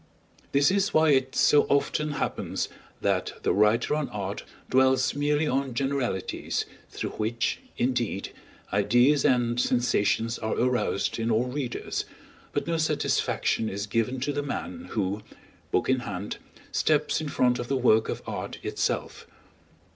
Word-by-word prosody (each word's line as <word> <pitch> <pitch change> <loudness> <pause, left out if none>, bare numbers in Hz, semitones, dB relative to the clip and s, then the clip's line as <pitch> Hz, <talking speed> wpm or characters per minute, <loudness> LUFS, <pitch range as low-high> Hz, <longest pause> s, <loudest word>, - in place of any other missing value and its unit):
This 140 +4 +4
is 200 0 +1
why 155 0 +5
it 130 -1 +2
so 145 - +5
often 145 +2 +1
happens - - -2 0.3
that - - 0
the - - +2
writer 105 +6 +3
on 150 -1 -1
art 100 -1 -4 0.3
dwells 130 0 +3
merely 145 +1 +1
on 135 -3 -1
generalities, 135 -7 -1 0.2
through - - -4
which, 115 +2 -1 0.2
indeed, 120 -5 -1 0.4
ideas 120 +8 +4
and 120 -1 +2
sensations 115 -2 +1
are 110 - -1
aroused 125 -4 0
in 115 +1 0
all 115 +2 +2
readers, 125 -2 -3 0.5
but - - -1
no 170 -1 0
satisfaction 150 -7 0
is 100 +1 -3
given 115 +4 0
to 145 +2 -1
the 145 - -1
man 250 - -5
who, 100 0 -1 0.5
book - - +1
in 130 0 +3
hand, 100 -4 -5 0.3
steps 150 0 +2
in 155 - -3
front 125 -2 +2
of 120 - -4
the 135 - +1
work 110 -3 +4
of - - -4
art - - -5
itself. - - -2
125 Hz, 145 wpm, -27 LUFS, 115-145 Hz, 0.5 s, why